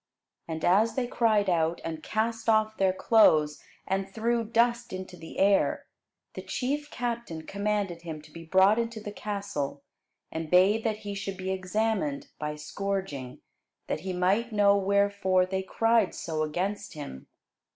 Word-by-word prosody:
And 160 -1 -3
as 210 +6 +4
they 260 -2 0
cried 220 -4 +2
out, 170 -2 +1
and 160 -1 -4
cast 225 +3 -1
off 215 0 +3
their 190 -1 +3
clothes, 160 -7 +4 0.3
and 195 0 -1
threw 230 +3 0
dust 235 +1 +1
into 185 -1 -6
the 165 -2 -10
air, 195 0 +3 0.5
the - - -6
chief 290 +3 -2
captain 235 -10 -4
commanded 200 -4 -2
him 160 -3 -6
to 155 - -16
be 165 +2 -9
brought 190 +6 +4
into 230 -1 -2
the 210 -1 -6
castle, 200 -10 -4 0.5
and 160 -1 -4
bade 195 +6 +5
that 220 -2 0
he 205 - -3
should 195 -1 -5
be 190 0 -3
examined 220 +10 -1
by 150 0 -3
scourging; 150 -4 -4 0.4
that - - -2
he 190 - -4
might 190 +7 +1
know 205 -1 +5
wherefore 200 -2 +2
they 190 +1 -2
cried 225 +2 +2
so 160 -2 -3
against 180 +5 -2
him. 140 - -8
195 Hz, 155 wpm, -28 LUFS, 175-220 Hz, 0.5 s, bade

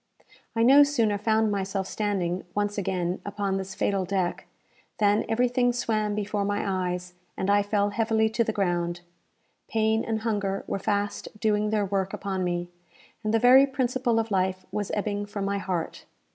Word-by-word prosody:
I 225 - +3
no 275 +4 +8
sooner 230 -8 +2
found 220 0 +2
myself 195 -1 -2
standing, 190 -4 -2
once 205 0 0
again, 180 -1 -2
upon 200 -1 -2
this 190 0 -5
fatal 195 -1 0
deck, 185 -1 -2 0.5
than 205 0 +3
everything 245 +2 +2
swam 215 -3 -1
before 210 0 -1
my 195 -2 -1
eyes, 180 0 -5 0.2
and 190 +1 0
I 205 0 +5
fell 205 0 0
heavily 220 0 +2
to 230 +1 +2
the 220 - -1
ground. 175 -4 -1 0.7
Pain 220 0 +1
and 220 -1 -2
hunger 200 -3 -1
were - - -3
fast 205 +1 -1
doing 210 -1 +1
their 210 -1 +1
work 195 -1 -1
upon 190 -1 -3
me, 175 0 -2 0.5
and 215 - 0
the 225 - +4
very 255 +4 +7
principle 255 -3 0
of 225 -1 -1
life 185 -1 0
was 205 -2 -2
ebbing 205 0 -2
from 205 -1 -4
my 200 0 -1
heart. 180 -4 -4
205 Hz, 170 wpm, -26 LUFS, 190-220 Hz, 0.7 s, no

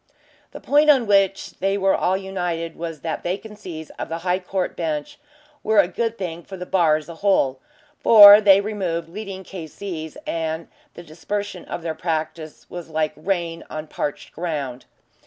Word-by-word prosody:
The - - -10
point 295 +2 +3
on 265 -5 +5
which 195 -2 +2
they 195 +2 +1
were 195 -1 +2
all 185 +1 +1
united 175 -4 -4
was 165 -3 -6
that 160 -2 -3
vacancies 185 -4 -6
of - - -4
the 165 - -3
High 180 +1 +1
Court 185 0 -3
Bench 160 - -3 0.4
were 220 0 +1
a 200 -3 +6
good 230 +5 -2
thing 175 -3 -5
for 190 +3 -10
the 180 - -6
bar 170 -5 +3
as 155 -1 -5
a 170 - -8
whole, 160 -9 +2 0.4
for 205 -2 +10
they 200 -1 +6
removed 185 -6 -3
leading 195 0 -7
K.C.'s, 165 -2 -7
and 160 0 -3 0.3
the 170 - -9
dispersion 185 +4 -5
of 170 - -6
their 165 -1 -2
practice 160 -1 -4
was 175 -2 -8
like 155 -1 -1
rain 170 -1 -2
on 155 0 -5
parched 145 -1 -5
ground. 145 -7 -4
175 Hz, 170 wpm, -22 LUFS, 160-195 Hz, 0.4 s, for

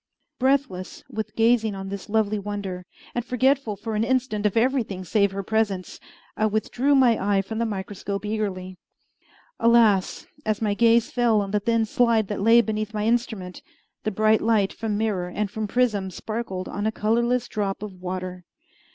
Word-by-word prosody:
Breathless 260 -8 0
with 220 0 -5
gazing 225 -2 +3
on 195 0 -6
this 200 0 -7
lovely 215 -1 +1
wonder, 195 -3 -5 0.3
and 240 - -1
forgetful 255 -2 +1
for 220 +3 -5
an 215 +1 +1
instant 235 -4 +1
of 205 - -2
everything 225 -6 +1
save 200 +2 +2
her 195 0 -4
presence, 200 -3 -1 0.4
I 215 - +2
withdrew 240 +6 +1
my 250 -4 +4 0.2
eye 195 - +2
from 220 +3 -5
the 230 - +1
microscope 200 0 -4
eagerly. 190 -4 -3 0.8
Alas! 230 -5 +3 0.2
as 215 -1 0
my 210 -2 0
gaze 230 +1 +3
fell 235 -3 +3
on 200 -1 -2
the 210 - +2
thin 230 +2 +1
slide 225 -2 +2
that 205 -2 -3
lay 230 +3 +6
beneath 215 -1 -3
my 210 0 -1
instrument, 220 -6 -1 0.4
the 215 - 0
bright 215 +1 +3
light 215 -3 +2
from 215 -2 -2
mirror 205 -5 -1
and 205 +2 -3
from 220 -1 -3
prism 210 -5 +1
sparkled 195 -1 -5
on 205 +1 -2
a - - +1
colorless 235 +3 +1
drop 205 -2 -3
of 210 -2 -6
water! 185 0 -5
215 Hz, 170 wpm, -24 LUFS, 200-230 Hz, 0.8 s, lay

